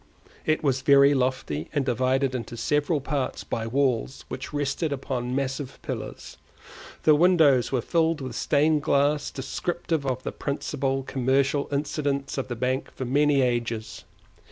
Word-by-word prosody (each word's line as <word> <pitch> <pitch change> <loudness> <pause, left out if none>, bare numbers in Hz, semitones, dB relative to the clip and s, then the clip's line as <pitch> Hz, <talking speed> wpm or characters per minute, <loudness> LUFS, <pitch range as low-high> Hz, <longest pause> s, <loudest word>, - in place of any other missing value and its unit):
It 155 0 +1
was 135 -2 +1
very 140 +1 +6
lofty 130 - -1
and 140 -2 +1
divided 130 +2 +1
into 120 -1 -5
several 145 +4 +1
parts 135 -1 -2
by 115 -1 -3
walls 130 0 0
which 130 - -6
rested 145 +2 -1
upon 130 -2 -3
massive 135 0 -3
pillars; - - -6 0.7
the 155 - +6
windows 150 -6 +4
were 125 -4 0
filled 165 -1 +1
with 130 -4 -6
stained 150 +5 +2
glass 145 0 +2
descriptive 165 +3 -3
of 130 -2 -2
the - - -3
principal 135 -1 -2
commercial 135 +2 +1
incidents 140 -1 -1
of 130 - -3
the 120 - -4
bank 130 +3 -1
for 130 - -4
many 145 +2 +3
ages. 120 -3 -2
135 Hz, 145 wpm, -26 LUFS, 130-145 Hz, 0.7 s, very